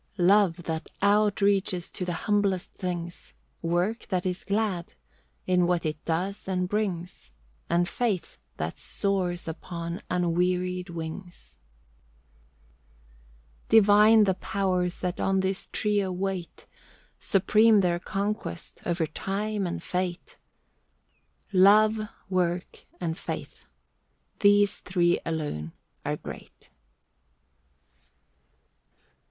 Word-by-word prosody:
Love, 185 -2 +4
that 160 -1 -4
outreaches 200 -3 +2
to - - -4
the 180 -1 -2
humblest 200 -3 +1
things; 175 -2 -5 0.3
Work 175 +7 -1
that 185 -2 -1
is 180 0 -2
glad, 200 - -1 0.5
in 180 -1 +3
what 175 -2 0
it 155 -1 -3
does 185 +5 -2
and 180 -1 0
brings; 180 - -3 0.4
And 175 +1 +2
faith 200 - -2 0.2
that 80 +2 -4
soars 185 -4 -1
upon 170 +2 -5
unwearied 180 +1 0
wings. 165 - -8 2.1
Divine 215 0 +7
the 190 -2 +3
Powers 185 -2 -1
that 180 -1 -2
on 190 0 +2
this 190 0 -2
trio 205 -3 0
wait. 185 -1 -4 0.5
Supreme 210 +2 +4
their 175 -2 +1
conquest, 200 -2 -4
over 170 -1 +1
Time 200 +5 -2
and 170 -1 -4
Fate. 180 -1 -3 1.1
Love, 210 +3 +6 0.3
Work, 180 -1 -2
and 165 -2 -2
Faith—these 205 +1 -1
three 175 -2 +1
alone 145 - -3 0.3
are - - -2
great. - - -11
185 Hz, 95 wpm, -27 LUFS, 175-200 Hz, 2.1 s, Divine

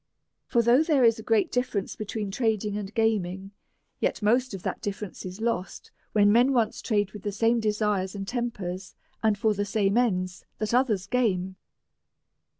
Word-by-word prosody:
For 235 -2 +2
though 240 +5 +5
there 305 -5 +3
is 230 -1 +4
a - - -5
great 220 -1 +1
difference 245 -6 -1
between 210 -1 -4
trading 215 -2 0
and 205 -1 -4
gaming, 195 -4 0 0.5
yet - - -1
most 245 +1 +2
of 190 - -9
that - - -3
difference 200 -2 -5
is 185 +4 -8
lost 225 -5 -3 0.2
when 205 -1 +4
men 245 +5 +4
once 235 -4 +1
trade 205 -4 0
with 210 - -9
the 205 - -3
same 225 +4 +2
desires 210 -3 0
and 195 -1 -5
tempers, 195 -7 -4 0.3
and 220 -2 +2
for 215 +1 +2
the 205 0 -1
same 205 0 +1
ends 185 -7 -1
that 215 +1 -2
others 235 -7 +2
game. 190 -5 0
210 Hz, 170 wpm, -27 LUFS, 195-230 Hz, 0.5 s, though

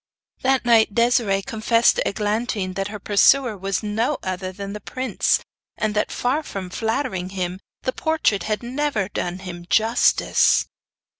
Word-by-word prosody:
That 265 -1 +2
night 225 -3 +4
Desiree 235 -5 +2
confessed 230 +2 +2
to - - 0
Eglantine 210 -2 -1
that 195 +1 -2
her 210 +1 -6
pursuer 215 +4 +3
was 195 +1 -2
no 225 +7 0
other 185 0 -3
than 200 +1 -7
the 210 - -7
prince, 255 +5 0 0.4
and 215 -1 -1
that 210 - 0
far 260 +5 0
from 190 -10 -7
flattering 220 -4 -2
him, 185 -1 -4 0.2
the 255 - -1
portrait 315 -11 +1
had 215 0 -2
never 245 -5 -1
done 180 -3 -3
him 175 -1 -8
justice. 225 +2 +3
210 Hz, 150 wpm, -22 LUFS, 195-240 Hz, 0.4 s, night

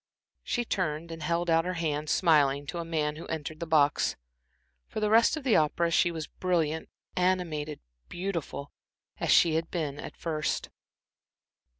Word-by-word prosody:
She 240 - -1
turned 165 -5 -2
and 165 0 -7
held 170 +3 0
out 165 0 +4
her 180 +1 -3
hand, 155 -2 -2
smiling, 145 -6 +3
to 170 - -5
a - - -2
man 155 -2 -1
who 165 - -8
entered 155 0 -4
the 170 - -4
box. 150 -2 +3 0.7
For - - -4
the 210 0 +1
rest 230 +7 +5
of 310 - -6
the 255 -5 +3
opera 165 +2 +2
she 175 - +4
was 160 -2 -4
brilliant, 160 -4 -1 0.3
animated, 170 -5 0 0.3
beautiful, 175 -6 -4 0.5
as - - -1
she 165 - +6
had 165 +1 -1
been 150 -5 -3
at - - -8
first. 155 -2 -2
165 Hz, 165 wpm, -29 LUFS, 150-175 Hz, 0.7 s, she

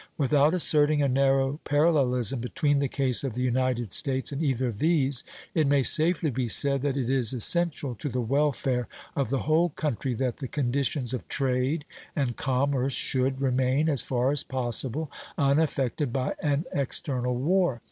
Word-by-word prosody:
Without 145 +1 +3
asserting 150 -3 +3
a - - +2
narrow 135 +1 +1
parallelism 135 - +1
between 145 +4 0
the 140 - 0
case 130 -2 -1
of 130 -5 -4
the 125 - -2
United 125 -4 -1
States 135 0 +1
and 140 +2 -4
either 130 -4 0
of 105 -3 -7
these, 145 -6 +2 0.3
it 160 -6 +1
may 140 -1 +3
safely 160 +2 +3
be 125 0 -2
said 140 +3 +3
that 140 -1 -1
it 130 -4 -2
is 130 -2 +1
essential 145 +2 +3
to 120 +6 -5
the 125 0 -3
welfare 130 -1 0 0.3
of 140 -5 -1
the 135 0 -1
whole 160 +4 +2
country 135 -5 -3
that 125 0 -2
the 135 - -6
conditions 135 -1 -1
of 125 - -5
trade 135 +3 -1 0.3
and 130 -5 -1
commerce 135 0 -1
should 130 +2 -1
remain, 130 +3 +1
as 145 -5 +2
far 125 +1 0
as 145 - +3
possible, 130 +3 -3 0.3
unaffected 140 -2 0
by 130 +1 -2
an 145 +2 0
external 130 -2 -1
war. 160 0 +1
135 Hz, 165 wpm, -26 LUFS, 125-145 Hz, 0.3 s, Without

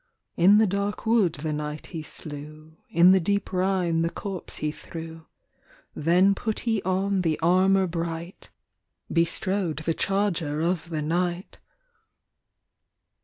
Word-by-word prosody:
In 190 +4 +6
the 220 - +5
dark 200 +2 -2
wood 220 -7 +3
the 155 -1 -3
knight 150 0 -5
he 160 - -4
slew; 155 +1 -8
In 175 +2 +6
the 190 - +5
deep 200 +3 -1
Rhine 185 -3 +1
the 165 - +1
corpse 195 -1 -6
he 150 - -2
threw. 160 +1 -9 0.7
Then 180 +6 +3
put 220 +2 -3
he 225 -4 0
on 190 +1 0
the 160 -3 0
armour 185 +3 +3
bright; 170 0 -5 0.6
Bestrode 170 0 0
the 165 - +1
charger 180 -6 0
of 170 +1 -1
the 155 -2 -3
knight. 175 +3 -2
175 Hz, 130 wpm, -25 LUFS, 160-195 Hz, 0.7 s, In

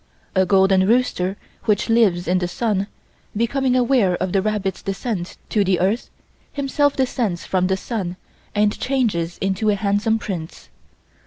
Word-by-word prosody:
A 190 -1 +2
golden 190 0 +4
rooster 205 -5 +1 0.3
which 210 -2 +1
lives 215 -7 +3
in 180 +1 +2
the 180 - -1
sun, 200 +1 -1 0.5
becoming 255 +3 +1
aware 245 -7 +3
of 185 +1 -2
the 195 - +2
rabbit's 205 -2 -2
descent 195 -2 -4
to 210 - +2
the 185 -2 +1
earth, 200 +6 0 0.4
himself 285 0 +1
descends 235 -9 -1
from 185 -1 +1
the 190 0 +1
sun 190 -4 -4 0.4
and 210 0 +2
changes 220 -11 0
into 195 +3 0
a 205 - +3
handsome 205 +2 +1
prince. 170 - -6
200 Hz, 150 wpm, -21 LUFS, 185-230 Hz, 0.5 s, golden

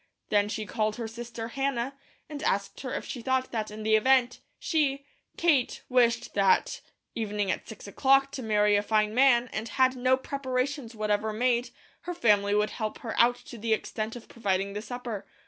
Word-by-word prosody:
Then 205 0 +2
she 215 0 -3
called 215 +2 -1
her 235 -2 -4
sister 230 0 -7
Hannah, 270 0 -1 0.3
and 295 -2 -7
asked 200 0 -1
her 255 - -5
if - - -4
she 245 - -6
thought 260 +1 0
that 220 -2 -2
in 215 +1 -8
the 220 0 +4
event 250 +2 +3 0.2
she, 280 -4 0 0.3
Kate, 305 -8 +2
wished 240 -2 +2
that 195 -2 +2 0.3
evening 210 -3 -1
at - - -4
six 220 - -10
o'clock 270 +6 +3
to 280 - -5
marry 210 -2 +3
a 205 - +3
very 205 - -15
fine 215 -1 +2
man, 250 -1 +4
and 220 +1 -3
had 260 -1 +3
no 255 +1 +3
preparations 260 -2 -3
whatever 215 0 0
made, 240 +2 +1 0.4
her 355 - -3
family 205 -8 +3
would 210 0 +1
help 215 -3 -4
her 230 -4 -4
out 240 +1 +5
to 235 - -10
the 225 +1 +1
extent 215 +1 -5
of 240 - -10
providing 195 -3 -1
the 205 - -4
supper. 240 -3 -6
235 Hz, 190 wpm, -28 LUFS, 215-260 Hz, 0.4 s, out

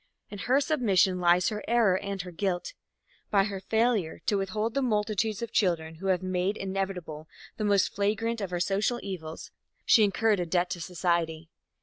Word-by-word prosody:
In 205 - -7
her 260 +7 +2
submission 215 - +2
lies 175 0 +4
her 210 -1 -5
error 230 -5 +3
and 195 -1 -3
her 180 - -8
guilt. 180 - -2 0.6
By 200 -2 +4
her 200 -1 -4
failure 220 -4 0
to 205 - +2
withhold 210 +3 -1
the 275 - 0
multitudes 215 -2 0
of 235 - -5
children 160 -5 0
who 195 - -3
have 185 -1 +1
made 185 +2 -1
inevitable 190 -5 -4 0.3
the 215 - -2
most 200 -2 +2
flagrant 220 +3 -1
of 195 -2 -4
our 175 - -1
social 200 +7 0
evils, 165 -5 -7 0.3
she 220 - +6
incurred 210 +1 +2
a 175 - -1
debt 175 +1 0
to 175 - -4
society. 165 -2 -1
195 Hz, 180 wpm, -28 LUFS, 180-215 Hz, 0.6 s, she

